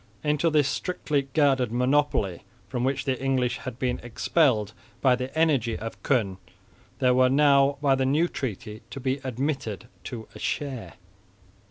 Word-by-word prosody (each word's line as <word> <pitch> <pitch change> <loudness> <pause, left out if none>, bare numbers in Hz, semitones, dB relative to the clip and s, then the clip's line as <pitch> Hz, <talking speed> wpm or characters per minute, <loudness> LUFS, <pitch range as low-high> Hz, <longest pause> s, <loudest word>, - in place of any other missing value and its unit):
Into 150 +2 +2
this 150 -3 +3
strictly 145 -3 -1
guarded 135 -6 +3
monopoly, 125 -7 +1 0.3
from 125 - -3
which 130 0 0
the 130 -1 -1
English 130 -2 +1
had 130 -3 -7
been 125 -1 -1
expelled 120 - +1 0.3
by 130 -2 +4
the 125 +1 -4
energy 135 -8 +2
of 115 +1 -7
Koen, 100 -9 0 0.6
they 125 -1 +3
were 130 0 +4
now 140 0 +4
by 140 -2 +4
the 135 0 +1
new 155 +6 +3
treaty 110 - -5
to 140 - -7
be 135 +1 -1
admitted 130 - -3 0.2
to 115 -3 -6
a - - -11
share. 135 -5 -3
130 Hz, 155 wpm, -26 LUFS, 120-140 Hz, 0.6 s, by